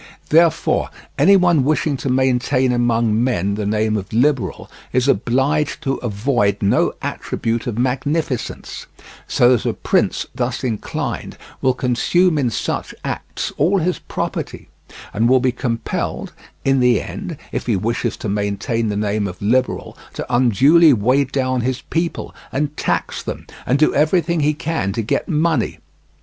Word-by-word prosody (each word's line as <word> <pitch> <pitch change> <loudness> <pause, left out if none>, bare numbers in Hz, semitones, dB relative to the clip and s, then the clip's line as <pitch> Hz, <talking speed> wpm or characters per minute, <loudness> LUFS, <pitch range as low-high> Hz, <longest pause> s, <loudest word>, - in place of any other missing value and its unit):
Therefore, 165 0 +3 0.3
any 200 - +6
one 175 -6 +4
wishing 150 +1 +1
to 130 +2 -3
maintain 130 0 +2
among 115 -2 +1
men 100 -6 0
the 105 0 -2
name 110 +1 +1
of 100 -3 -4
liberal 120 - 0 0.2
is 125 +1 +1
obliged 140 +6 +1
to 135 -2 0
avoid 105 -2 0
no 100 - +2
attribute 115 +2 -3
of 115 -3 -3
magnificence; 130 +1 -2 0.4
so 120 +1 +4
that 120 - -2
a - - -3
prince - - 0
thus - - -2
inclined 115 -5 -3 0.2
will 130 -1 +2
consume 155 +7 +2
in 130 -4 +1
such - - -3
acts - - -4
all 195 +4 +3
his 180 0 0
property, - - -5 0.4
and 115 +3 +2
will 130 0 +5
be 130 0 +1
compelled 120 -2 -3 0.3
in 135 0 +3
the 125 -1 +4
end, 180 -6 -6
if - - -4
he 115 - +2
wish 115 +5 -1 0.2
to - - -5
maintain 105 +3 -1
the 105 - -2
name 105 0 0
of 90 -2 -8
liberal, 125 +5 0 0.2
to - - -4
unduly 135 - +5
weigh 130 +5 +2
down 130 -1 -1
his 130 +2 -2
people, 165 +1 -2 0.2
and 145 +2 -2
tax - - -1
them, - - -6 0.2
and 130 - +3
do 155 - +3
everything 170 +3 +2
he 150 0 +2
can 160 -11 -2
to 115 - -2
get 105 - -1
money. 160 -5 +1
130 Hz, 155 wpm, -19 LUFS, 115-150 Hz, 0.4 s, any